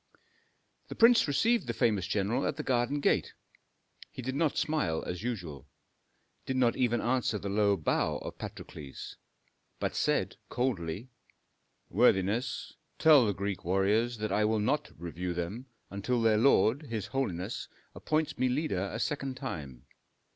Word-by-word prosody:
The - - -7
prince 230 -3 +6
received 225 +12 +2
the - - -2
famous 105 -7 +1
general 105 +7 0
at - - -1
the - - -4
garden 125 +3 0
gate. - - +1 0.8
He 130 - -8
did 130 +2 -2
not 150 +1 0
smile 150 - 0
as 90 +1 -4
usual, 85 - -5 0.8
did 130 - -1
not 120 -2 +3
even 120 -2 +1
answer 125 -2 +1
the 100 - -5
low 100 0 +2
bow 80 - 0
of - - -8
Patrokles, 70 -3 -8 0.6
but - - -2
said - - 0
coldly, 110 -2 -2 0.8
"Worthiness, 100 +7 +2 0.2
tell 150 -7 +6
the 100 - +1
Greek 100 0 -3
warriors 105 +6 +1
that 110 0 -3
I 105 - +2
will 110 +1 +2
not 150 +8 0
review 85 +1 -4
them 100 +10 -4 0.2
until 100 +5 -1
their 110 -2 +3
lord, 135 +3 +3
his 110 -4 -3
holiness, 100 -7 -3 0.3
appoints 155 0 -1
me 130 - +2
leader 125 - -1
a - - -4
second 135 +1 -2
time. 70 - -6
115 Hz, 145 wpm, -30 LUFS, 95-130 Hz, 0.8 s, prince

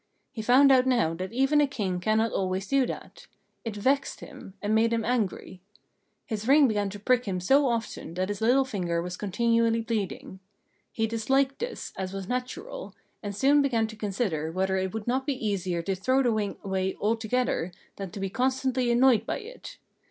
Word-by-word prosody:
He 235 - -5
found 260 +5 +6
out 260 -1 +5
now 235 -11 +2
that 185 +4 -5
even 270 +5 +3
a 290 - +3
King 200 -9 -2
cannot 220 +3 +1
always 190 0 -2
do 270 0 +2
that; - - -8 0.4
it 225 -3 -4
vexed 270 +7 0
him, 260 -8 -11
and 210 +1 -1
made 225 +1 +3
him 230 -1 0
angry. 210 -6 -2 0.6
His 220 0 -4
ring 280 +1 +6
began 205 -3 0
to 205 +1 -8
prick 250 +4 +2
him 190 -3 -2
so 270 +10 +4
often 230 -7 -3
that 185 +2 -1
his 205 +1 -4
little 255 +4 +4
finger 180 -9 -2
was 180 +1 -4
continually 230 +3 +1
bleeding. 210 -4 -4 0.5
He 225 - 0
disliked 265 +5 +1
this, 480 +1 -5
as 190 0 -4
was 195 -1 -5
natural, 255 - -5 0.3
and 205 -2 -5
soon 280 +6 +4
began 240 -5 +1
to 220 0 -8
consider 195 -7 -2
whether 190 +2 0
it 190 0 -1
would 220 0 -5
not 260 +3 -1
be 285 - 0
easier 180 -4 -1
to 195 - -1
throw 255 +8 +1
the 245 - +2
ring 210 -2 -2
away 190 -1 -1
altogether 225 -3 0 0.3
than 195 -2 -5
to 200 - -8
be 195 - -1
constantly 260 0 0
annoyed 240 -1 +4
by - - -1
it. - - -10
225 Hz, 190 wpm, -27 LUFS, 195-255 Hz, 0.6 s, found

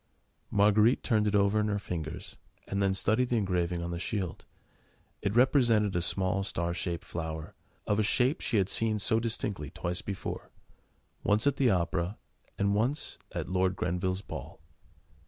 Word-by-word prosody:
Marguerite 105 +4 +4
turned 110 -4 +2
it 105 - +1
over 100 +1 +3
in 105 - +1
her 105 -1 0
fingers, 80 -6 -5 0.3
and 100 0 -1
then 95 -1 +2
studied 110 +6 +2
the 120 - +2
engraving 90 -4 0
on 85 - -3
the 85 - -3
shield. 95 -3 -3 0.8
It 100 +1 -1
represented 120 -6 +4
a 85 - +2
small 95 +2 +1
star 85 -3 -1
shaped 85 -1 -3
flower, 80 -1 -5 0.3
of 105 +1 +1
a - - +5
shape 125 +7 +2
she 115 - 0
had 95 -2 +3
seen 110 0 +1
so 110 +2 +2
distinctly 105 - -2
twice 90 +3 -3
before: 100 -2 -5 0.7
once 105 +4 +2
at 140 -1 +2
the 130 -3 +4
opera, 90 +1 0 0.4
and 100 0 +2
once 120 +8 -1
at - - -4
Lord 95 0 +1
Grenville's 90 +1 -1
ball. - - -8
100 Hz, 165 wpm, -30 LUFS, 90-110 Hz, 0.8 s, a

